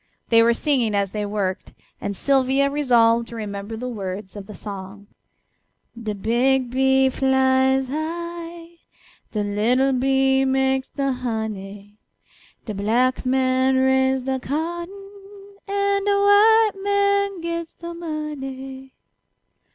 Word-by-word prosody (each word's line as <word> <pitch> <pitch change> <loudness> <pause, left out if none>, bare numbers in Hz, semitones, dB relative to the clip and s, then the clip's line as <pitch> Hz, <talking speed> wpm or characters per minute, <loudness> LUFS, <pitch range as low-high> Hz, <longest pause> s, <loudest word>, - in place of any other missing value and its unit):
They 230 -1 +6
were 235 +1 +4
singing 245 -7 0
as 200 -1 0
they 210 -1 -3
worked, 200 -3 -3 0.3
and 200 -1 -4
Sylvia 275 +2 +2
resolved 235 -5 +3
to 235 - -9
remember 205 0 -6
the 250 +3 -5
words 195 -4 -6
of 200 -2 -8
the 210 - -10
song: 200 0 -8 0.9
"De 220 -3 -5
big 245 +5 +1
bee 265 +1 +3
flies 265 0 +2
high, 335 +3 -6 0.5
De 210 -2 -2
little 235 +7 +1
bee 265 +1 +2
makes 265 0 +1
de 275 -1 -1
honey, 210 -4 -5 0.7
De 215 - -5
black 240 +6 0
man 260 0 +2
raise 265 0 +2
de 265 0 -2
cotton, 345 +8 -4 0.6
An' 400 0 0
de 410 - +2
white 425 +2 +5
man 400 -1 +1
gets 335 0 -5
de 340 0 -8
money." 270 -5 -7
265 Hz, 120 wpm, -22 LUFS, 225-305 Hz, 0.9 s, They